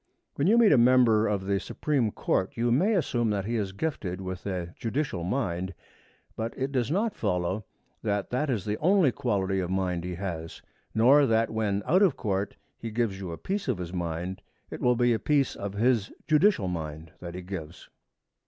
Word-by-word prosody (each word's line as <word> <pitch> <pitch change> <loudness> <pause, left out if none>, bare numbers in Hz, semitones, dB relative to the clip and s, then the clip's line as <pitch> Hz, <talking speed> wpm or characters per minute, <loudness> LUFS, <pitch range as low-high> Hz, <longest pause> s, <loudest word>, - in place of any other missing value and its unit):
When 140 - 0
you 225 +4 +5
meet 230 -3 +6
a 135 - +6
member 120 -3 +5
of 100 -2 -1
the 100 0 +1
Supreme 135 -3 0
Court 95 -1 -1
you 120 +1 +1
may 190 - +3
assume 120 - +1
that 100 -2 -1
he 115 +3 -2
is 100 -4 -1
gifted 95 - -3
with 95 0 -6
a 90 -3 -3
judicial 115 - -2
mind. 95 -4 -2 0.6
But 115 +1 -4
it 135 +1 -2
does 125 -4 0
not 205 +7 +1
follow 95 0 -1 0.4
that 100 -2 -1
that 130 +4 0
is 110 -8 -1
the 105 0 -2
only 180 -4 +4
quality 100 -8 0
of 90 -2 -2
mind 90 -2 -1
he 90 0 -4
has; 85 -3 -6 0.3
nor 135 +6 +6
that 115 0 +2
when, 105 -2 -1
out 185 +4 +4
of 190 -9 +4
court, 100 -1 -2 0.2
he 115 - -5
gives 110 -3 -1
you 95 -3 -5
a 85 - -6
piece 195 -2 -3
of 125 -6 0
his 90 -1 -6
mind, 85 +1 -3 0.3
it - - -6
will 125 0 +3
be 120 0 +3
a 110 - 0
piece 140 +2 +1
of 100 -1 -5
his 115 -1 +1 0.2
judicial 155 - +4
mind 80 -2 -5
that 85 0 -7
he 90 - -6
gives. 85 -3 -7
105 Hz, 200 wpm, -27 LUFS, 95-130 Hz, 0.6 s, meet